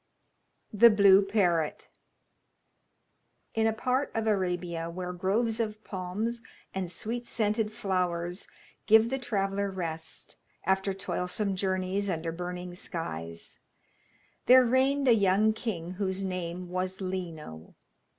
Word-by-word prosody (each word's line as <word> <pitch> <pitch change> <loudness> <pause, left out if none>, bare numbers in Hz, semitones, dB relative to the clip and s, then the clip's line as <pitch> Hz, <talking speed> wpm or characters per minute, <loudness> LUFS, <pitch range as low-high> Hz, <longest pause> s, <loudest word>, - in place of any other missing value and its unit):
THE 235 +3 +8
BLUE 200 -2 +7
PARROT 175 -6 +1 1.7
In 225 0 +2
a - - +3
part 255 +5 0
of 225 0 0
Arabia 180 -5 -1
where 180 +1 -5
groves 215 +6 0
of 215 -1 -3
palms 205 +5 -3 0.3
and 185 -2 -3
sweet 235 +5 -4
scented 215 -1 0
flowers 180 -4 -2 0.4
give 220 +2 +6
the 270 - -1
traveller 200 -4 -1
rest 165 -4 -5 0.3
after 190 +1 +1
toilsome 190 +2 -2
journeys 190 +1 -1
under 165 -2 -2
burning 180 +1 -5
skies, 85 - -6 0.9
there 255 0 +8
reigned 265 +3 +2
a 240 - +8
young 205 +1 +3
king 195 -7 -4
whose 190 0 -2
name 180 -1 -4
was 185 +1 -2
Lino. 170 - -6
190 Hz, 115 wpm, -29 LUFS, 180-220 Hz, 1.7 s, THE